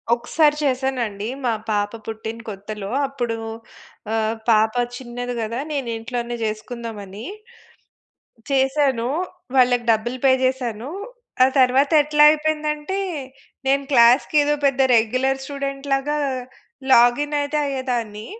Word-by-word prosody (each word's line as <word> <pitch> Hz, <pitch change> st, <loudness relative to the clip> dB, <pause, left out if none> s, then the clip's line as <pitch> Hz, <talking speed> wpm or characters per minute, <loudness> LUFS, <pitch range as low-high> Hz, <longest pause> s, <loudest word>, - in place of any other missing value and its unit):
ఒకసారి 295 Hz, +5 st, +2 dB
చేశానండి. 250 Hz, -6 st, -1 dB, 0.2 s
మా 235 Hz, -, +2 dB, 0.2 s
పాప 205 Hz, 0 st, 0 dB
పుట్టిన 220 Hz, +1 st, -6 dB
కొత్తలో 205 Hz, 0 st, -7 dB, 0.2 s
అప్పుడు. 240 Hz, -4 st, -3 dB, 0.8 s
ఆహ్, 220 Hz, 0 st, 0 dB
పాప 220 Hz, 0 st, +4 dB, 0.2 s
చిన్నది 245 Hz, -1 st, -5 dB
గదా! 230 Hz, +3 st, -3 dB
నేను 270 Hz, -5 st, -2 dB
ఇంట్లోనే 240 Hz, +1 st, -4 dB
చేసుకుందామని, 215 Hz, -1 st, -6 dB, 1.3 s
చేశాను. 265 Hz, -3 st, +1 dB, 0.5 s
వాళ్ళకి 245 Hz, -1 st, +4 dB
డబ్బులు 240 Hz, +4 st, -2 dB
పే 265 Hz, -, +6 dB
చేశాను. 255 Hz, -1 st, -2 dB, 0.5 s
ఆ -, -, +6 dB
తరువాత 260 Hz, +2 st, +4 dB
ఎట్లా 295 Hz, 0 st, +2 dB
అయిపోయిందంటే 305 Hz, +3 st, -1 dB, 0.7 s
నేను 275 Hz, +1 st, +3 dB
క్లాస్‌కి 245 Hz, +5 st, +5 dB
ఏదో 295 Hz, +1 st, +2 dB
పెద్ద 270 Hz, -1 st, +1 dB, 0.2 s
రెగ్యులర్ 255 Hz, +4 st, +1 dB
స్టూడెంట్‌లాగా 275 Hz, +1 st, -2 dB, 0.8 s
లాగిన్ 245 Hz, +5 st, +4 dB
అయితే 300 Hz, +1 st, -1 dB
అయ్యేదాన్ని. 240 Hz, -6 st, -3 dB
250 Hz, 105 wpm, -21 LUFS, 225-275 Hz, 1.3 s, పే